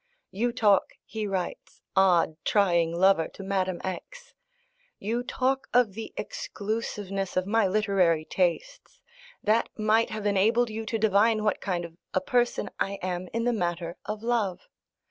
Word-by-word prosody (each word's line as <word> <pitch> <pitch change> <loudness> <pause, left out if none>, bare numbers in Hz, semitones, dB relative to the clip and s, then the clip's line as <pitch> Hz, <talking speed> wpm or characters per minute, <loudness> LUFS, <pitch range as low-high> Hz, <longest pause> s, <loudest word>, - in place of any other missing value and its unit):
"You 235 +5 0
talk," 210 -5 +2
he 220 -2 -4
writes, 190 -3 -5
odd, 180 -4 +4
trying 170 -5 +3
lover, 175 -1 +3
to 195 - -11
Madame 190 -2 -1
X. 485 - -7 0.6
"You 230 +4 -2
talk 260 +2 -1
of 245 -5 +4
the 225 +2 -7
exclusiveness 205 - -4
of 185 - +1
my 220 +1 +2
literary 185 -6 +2
tastes. 175 -1 -2 0.4
That 220 +2 +2
might 220 +1 +3
have 215 -1 -5
enabled 220 +4 +3
you 220 0 -5
to 225 - -1
divine 215 +1 +3
what 210 - 0
kind 175 -3 -2
of 165 0 -12 0.2
a - - +4
person 240 +5 0
I 195 - 0
am 180 0 -3
in 230 0 -1
the 245 0 +2
matter 175 -4 -2
of 210 +1 -5
love. 230 -6 -1
205 Hz, 150 wpm, -27 LUFS, 185-225 Hz, 0.6 s, odd